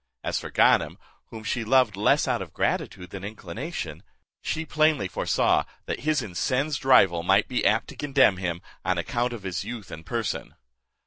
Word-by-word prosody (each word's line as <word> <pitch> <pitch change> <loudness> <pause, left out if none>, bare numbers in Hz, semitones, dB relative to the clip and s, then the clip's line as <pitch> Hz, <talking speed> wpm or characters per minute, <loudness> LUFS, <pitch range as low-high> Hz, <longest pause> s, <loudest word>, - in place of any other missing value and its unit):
As - - -1
for - - -7
Ganem, - - +3 0.3
whom 110 -1 -9
she 115 +2 -2
loved 125 -3 +3
less 100 - +3
out - - 0
of - - -8
gratitude 90 -1 -2
than 95 -1 -7
inclination, 100 - -6 0.4
she 160 +1 -2
plainly 155 -9 +2
foresaw - - +1 0.2
that - - -3
his 150 +1 0
incensed 130 - -1
rival 95 -10 +5
might 95 +4 +3
be 125 - -1
apt 110 +3 +2
to - - -10
condemn 135 -9 +3
him, 90 -1 -3 0.2
on 95 -1 0
account 120 +8 -1
of 115 -4 -7
his 90 -3 -3
youth 110 -6 -7
and 80 - -8
person. 115 +2 -3
110 Hz, 175 wpm, -26 LUFS, 95-130 Hz, 0.4 s, rival